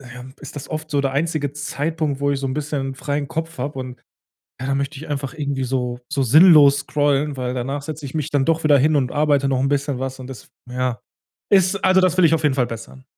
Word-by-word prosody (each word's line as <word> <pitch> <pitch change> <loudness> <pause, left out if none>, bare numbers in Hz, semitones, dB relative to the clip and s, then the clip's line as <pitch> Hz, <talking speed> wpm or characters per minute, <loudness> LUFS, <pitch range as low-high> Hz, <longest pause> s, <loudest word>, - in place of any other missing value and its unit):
ja, 125 -1 -11 0.2
ist - - -10
das 140 - -7
oft 155 0 -5
so 145 - +1
der 135 -1 -1
einzige 145 -1 -1
Zeitpunkt, 150 0 -3
wo 145 0 +1
ich 140 - -2
so 135 - -2
'n 130 - -3
bisschen 140 -3 -3
freien 145 0 -3
Kopf 160 -2 -5
habe 135 +1 -4
und 130 -1 -7 0.6
ja, 130 - -4
da 135 - 0
möchte 140 +2 -3
ich 155 - -9
einfach 140 -1 -3
irgendwie 140 -3 -3
so 125 -1 -2
so 140 - 0
sinnlos 145 +1 +7
scrollen, 145 0 0
weil 125 -1 -3
danach 135 +3 -3
setze 150 0 -7
ich 130 - -8
mich 155 -1 -2
dann 145 -3 +1
doch 165 0 +1
wieder 145 -2 +5
hin 150 +3 +3
und 130 -3 +1
arbeite 145 -2 +2
noch 135 -1 +1
'n 135 - +1
bisschen 145 -1 -1
was 130 0 -5
und 130 - -8
das 125 -7 -11 0.2
ja, 125 -1 -2 0.5
ist 190 0 +3
also 185 0 +5
das 185 -1 +2
will 185 - +4
ich 160 - +4
auf 160 -1 +2
jeden 145 -3 +2
Fall 130 -3 +1
bessern. 120 +3 -9
140 Hz, 245 wpm, -21 LUFS, 130-155 Hz, 0.6 s, sinnlos